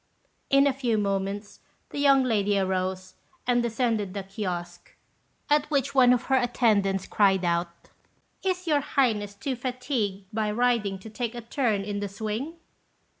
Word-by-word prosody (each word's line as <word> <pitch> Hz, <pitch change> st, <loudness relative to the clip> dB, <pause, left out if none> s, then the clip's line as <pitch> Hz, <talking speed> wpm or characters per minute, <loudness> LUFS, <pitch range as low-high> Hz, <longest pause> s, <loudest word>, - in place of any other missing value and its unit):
In 275 Hz, 0 st, +5 dB
a 280 Hz, -, +3 dB
few 245 Hz, -4 st, 0 dB
moments 200 Hz, 0 st, -2 dB, 0.3 s
the -, -, -4 dB
young 275 Hz, -2 st, +5 dB
lady 205 Hz, -4 st, +1 dB
arose 185 Hz, -1 st, -1 dB, 0.3 s
and 245 Hz, -1 st, +3 dB
descended 225 Hz, -4 st, -1 dB
the 200 Hz, -, -3 dB
kiosque; 175 Hz, -3 st, -6 dB, 0.5 s
at 295 Hz, 0 st, +2 dB
which 280 Hz, -2 st, 0 dB
one 255 Hz, -2 st, +6 dB
of 250 Hz, -1 st, +2 dB
her 265 Hz, -, +2 dB
attendants 215 Hz, -6 st, +2 dB
cried 195 Hz, -3 st, +2 dB
out, 170 Hz, 0 st, +1 dB, 0.7 s
"Is 370 Hz, -1 st, -1 dB
your 300 Hz, -3 st, +3 dB
Highness 225 Hz, -8 st, 0 dB
too 265 Hz, +5 st, -3 dB
fatigued 245 Hz, -6 st, -3 dB
by 215 Hz, -1 st, 0 dB
riding 220 Hz, -3 st, +1 dB
to 190 Hz, +4 st, -11 dB
take 235 Hz, +2 st, -3 dB
a 240 Hz, -, -5 dB
turn 225 Hz, -4 st, 0 dB
in 205 Hz, 0 st, -3 dB
the 205 Hz, 0 st, -3 dB
swing?" 220 Hz, -, -4 dB
220 Hz, 155 wpm, -26 LUFS, 195-255 Hz, 0.7 s, one